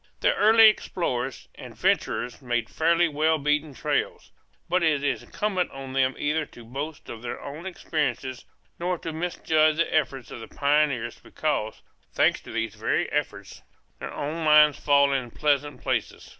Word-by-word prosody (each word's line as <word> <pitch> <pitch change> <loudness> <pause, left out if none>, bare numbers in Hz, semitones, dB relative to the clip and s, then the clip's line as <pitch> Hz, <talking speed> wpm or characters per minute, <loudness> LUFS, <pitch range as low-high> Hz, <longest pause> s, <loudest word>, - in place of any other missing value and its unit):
The - - +3
early 220 +1 +7
explorers 135 - -1
and - - -11
adventurers 125 +4 -1
make 120 -2 -1
fairly 170 +2 +2
well 155 +1 +1
beaten 150 0 0
trails; - - -2 0.4
but 180 +1 +1
it 155 -4 +2
is 140 -2 0
incumbent 195 -4 -2
on 135 -1 -8
them 135 0 +2
neither 150 +1 -1
to 120 - -14
boast 140 +6 -6
of 115 - -8
their 120 - -5
own 150 +6 -8
experiences 135 -8 -3 0.4
nor 180 +1 -1
to 165 -1 -6
misjudge 155 -2 +1
the 165 +1 0
efforts 135 -5 -1
of - - -7
the 115 - -9
pioneers 140 -5 0
because, 145 -8 -3 0.3
thanks - - +2
to - - -11
these 115 -1 -2
very 110 +1 -1
efforts, - - -4 0.4
their - - -6
own 155 +3 -4
lines 150 -1 +6
fall 140 -1 +4
in 130 -3 -2
pleasant 145 0 -1
places. - - -2
145 Hz, 160 wpm, -25 LUFS, 130-160 Hz, 0.4 s, early